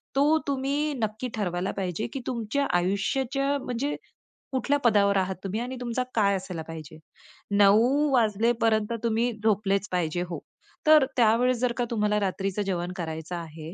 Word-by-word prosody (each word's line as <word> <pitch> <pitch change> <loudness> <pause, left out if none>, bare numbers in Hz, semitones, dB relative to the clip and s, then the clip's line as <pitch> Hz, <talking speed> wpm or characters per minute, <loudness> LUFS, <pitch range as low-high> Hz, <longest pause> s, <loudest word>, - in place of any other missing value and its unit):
तो 295 +3 +4
तुम्ही 280 +2 0
नक्की 220 +4 -2
ठरवायला 180 -3 -2
पाहिजे, 190 +2 -2
की 270 - -3
तुमच्या 245 +3 -1
आयुष्याच्या 265 +9 0
म्हणजे 255 +4 -2 0.6
कुठल्या 275 +2 +1
पदावर 205 -5 +3
आहात 190 0 0
तुम्हीआणि 230 +7 -3
तुमचा 245 +1 -1
काय 200 -3 +3
असायला 185 -3 -5
पाहिजे. 160 -1 -9 0.6
9:00 205 +3 +6 0.2
वाजेपर्यंत 225 -1 +2
तुम्ही 230 +1 +1
झोपलेच 200 -2 +1
पाहिजे, 175 -1 -1
हो. 170 - -4 0.5
तर 305 -3 +7
त्यावेळेस 240 +2 +4
जर 250 0 +1
का 245 - +1
तुम्हाला 210 -2 +1
रात्रीच 195 0 -2
जेवण 180 -3 -2
करायचं 160 0 -5
आहे, 165 -1 -8
215 Hz, 140 wpm, -26 LUFS, 190-250 Hz, 0.6 s, तर